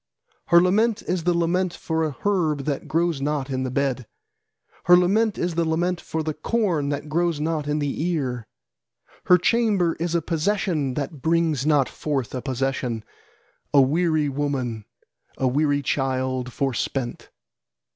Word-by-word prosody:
Her 170 - +7
lament 205 +5 +2
is 175 -2 -2
the 175 - +3
lament 175 +1 0
for 160 0 -2
a 155 -3 -2
herb 165 -8 +1
that 145 -3 -3
grows 165 -3 0
not 145 -1 -2
in 130 0 -1
the 130 - -2
bed, 130 -2 -1 0.8
Her 180 0 +8
lament 205 +4 +2
is 175 0 -1
the 170 +1 +1
lament 175 +2 0
for 160 0 -3
the 155 0 -2
corn 165 -3 0
that 145 +1 -3
grows 170 0 0
not 155 -1 -1
in 150 0 0
the 145 -1 -2
ear. 130 -9 -2 0.8
Her 180 - +7
chamber 200 -3 +2
is 170 0 -1
a 170 - +2
possession 165 -5 0
that 140 0 -4
brings 160 -2 +1
not 145 -4 +3
forth 140 -6 -3
a 130 - -3
possession, 130 -3 -2 0.7
A 140 - +8
weary 155 +2 +2
woman, 135 -6 -2 0.5
a 130 - +1
weary 145 +2 +1
child, 130 -1 -1
forspent. 130 -1 -3
150 Hz, 155 wpm, -23 LUFS, 135-175 Hz, 0.8 s, Her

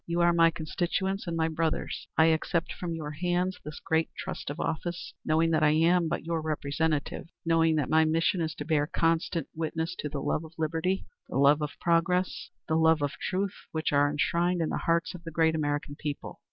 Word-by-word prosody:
You 170 +1 0
are 170 0 +5
my 165 -1 +6
constituents 180 +4 -2
and 165 -1 -2
my 160 0 +2
brothers. 160 0 -2
I 160 - +6
accept 165 +1 -1
from 170 -2 -4
your 150 -2 -5
hands 180 +4 -1
this 150 0 -7
great 160 0 0
trust - - -5
of 145 - -5
office, 170 +1 -3
knowing 165 +1 +2
that 155 -1 +2
I 155 - +5
am 170 +2 +4
but 160 -1 -3
your 165 -1 -1
representative, 155 0 -1 0.2
knowing 165 -1 +3
that 150 -4 0
my 160 0 +4
mission 165 +3 +1
is 160 -2 -2
to 145 - -6
bear 150 -2 +1
constant 165 +1 0
witness 160 +1 -3
to 150 - -3
the 145 - -4
love 150 - -1
of 160 0 -11
liberty, 165 +4 -1 0.2
the - - -2
love 140 +2 +5
of 150 0 -3
progress, 175 +2 +1 0.2
the 160 - -1
love 160 -2 +4
of 145 - 0
truth 195 +1 -1 0.2
which 160 0 -1
are 145 0 +4
enshrined 170 +5 +1
in 160 - 0
the - - -1
hearts 170 +1 +1
of 175 -1 -10
the 165 - -6
great 160 0 +2
American 145 -2 -2
people. 145 -1 -5
160 Hz, 205 wpm, -28 LUFS, 155-170 Hz, 0.2 s, my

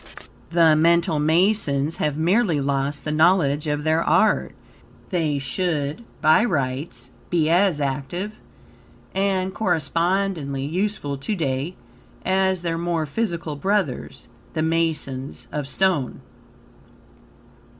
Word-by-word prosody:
The 165 -2 +5
Mental 170 0 +3
Masons 160 -2 +2
have 150 -1 -1
merely 175 0 +2
lost 140 +1 -1
the 150 - -1
knowledge 155 -2 +3
of 150 0 -1
their 160 +1 +2
art. - - +2 0.5
They 160 -5 0
should, 150 - -2 0.2
by 155 +8 +5
rights, 130 - -2 0.2
be 165 -2 +2
as 180 -3 +3
active 145 +8 -3 0.8
and 190 -1 0
correspondingly 170 -5 0
useful 165 -4 -2
to 210 +10 -2
day 145 +1 -2 0.5
as 190 -1 +1
their 165 -1 -1
more 170 -2 -1
physical 170 -2 -3
brothers, 190 -7 -2 0.3
the 155 - -1
masons 160 -5 -2
of 150 -2 -3
stone. 170 -2 0
160 Hz, 110 wpm, -23 LUFS, 145-185 Hz, 0.8 s, The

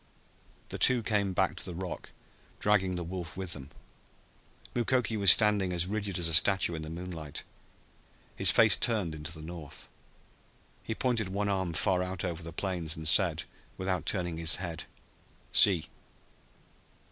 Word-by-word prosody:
The - - -7
two 125 -3 +4
came 105 -3 0
back 95 +1 0
to - - -1
the 90 - -6
rock, 90 0 -7 0.5
dragging 95 -3 +1
the 90 - -4
wolf 85 -1 -7
with 95 -3 0
them. 70 -2 -8 1.0
Mukoki 120 -1 0
was 100 -2 +4
standing 105 -2 +3
as 90 -1 +1
rigid 100 -1 -3
as 85 -2 +2
a 80 - 0
statue 95 +1 +4
in 80 - -6
the 80 - -8
moonlight, 85 -3 -7 0.9
his - - +6
face - - +6
turned 105 -9 -1
into 80 0 -5
the 80 -1 -6
north. 80 -4 -7 0.9
He 110 - -5
pointed 115 -6 -1
one 100 +2 -2
arm 95 -3 -2
far 90 +3 0
out 90 0 -4
over 85 -2 -5
the 85 0 -8
plains, 85 -3 -3
and 80 -1 -4
said, 85 -2 +5 0.3
without 95 -4 -3
turning 90 -4 -1
his 80 -1 +4
head, 85 -3 -6 0.7
"See!" 90 -6 +4
90 Hz, 160 wpm, -29 LUFS, 80-100 Hz, 1.0 s, his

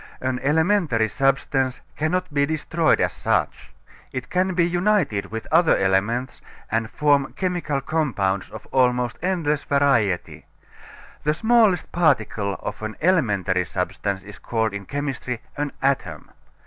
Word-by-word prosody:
An 130 -1 -2
elementary 160 - +2
substance 135 +1 0 0.2
cannot 160 +1 -1
be 140 0 +3
destroyed 160 +1 +1
as - - +1
such. - - -1 0.4
It 130 -1 -6
can 185 0 +1
be 170 -1 +3
united 175 - +1
with 115 +2 -6
other 165 +1 +5
elements 105 +7 0 0.3
and 115 0 0
form 145 0 +2
chemical 175 -7 -2
compounds 115 -11 -1
of 110 -1 -10
almost 125 -2 +1
endless 165 -5 0
variety. 120 -10 +1 0.8
The 150 +1 +1
smallest 220 -4 +3
particle 110 - +1
of - - -5
an 110 0 -4
elementary 100 - +2
substance 95 +1 -3
is 100 0 -12
called 110 -2 -1
in 100 -1 -6
chemistry 135 -4 -3 0.2
an 145 -1 -2
atom. 135 0 -1
135 Hz, 130 wpm, -23 LUFS, 110-160 Hz, 0.8 s, other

